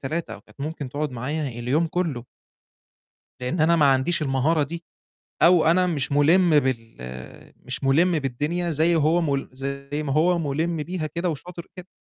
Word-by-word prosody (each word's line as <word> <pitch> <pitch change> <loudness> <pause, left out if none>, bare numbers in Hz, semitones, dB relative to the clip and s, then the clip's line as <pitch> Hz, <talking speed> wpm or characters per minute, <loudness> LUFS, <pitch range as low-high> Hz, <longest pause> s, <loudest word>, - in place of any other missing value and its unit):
3 160 +5 -3
أو - - -12
كانت - - -21
ممكن 150 -1 -4
تقعُد 145 +3 -3
معايا 140 +5 -3
اليوم 125 +7 0
كُلّه. 160 -8 -2 1.2
لإن 125 +7 -2
أنا 165 +2 +4
ما 145 -4 +5
عنديش 145 +6 0
المهارة 145 +3 +1
دي، 165 +4 -5 0.6
أو 175 -1 +6
أنا 180 +3 +4
مش 150 -6 -2
مُلمِ 155 +3 +5
بال 115 -5 -3 0.7
مش - - -5
مُلِم 160 +5 +3
بالدنيا 150 +6 -2
زي 165 +2 +2
هو 160 +2 +3
مُل 140 -4 -1
زي 140 +2 -5
ما 140 - -3
هو 170 +4 +3
مُلِم 160 +3 -1
بيها 155 +1 -3
كده 170 +3 -2
وشاطر 170 +2 -7
كده. 180 0 -9
155 Hz, 165 wpm, -24 LUFS, 140-170 Hz, 1.2 s, أو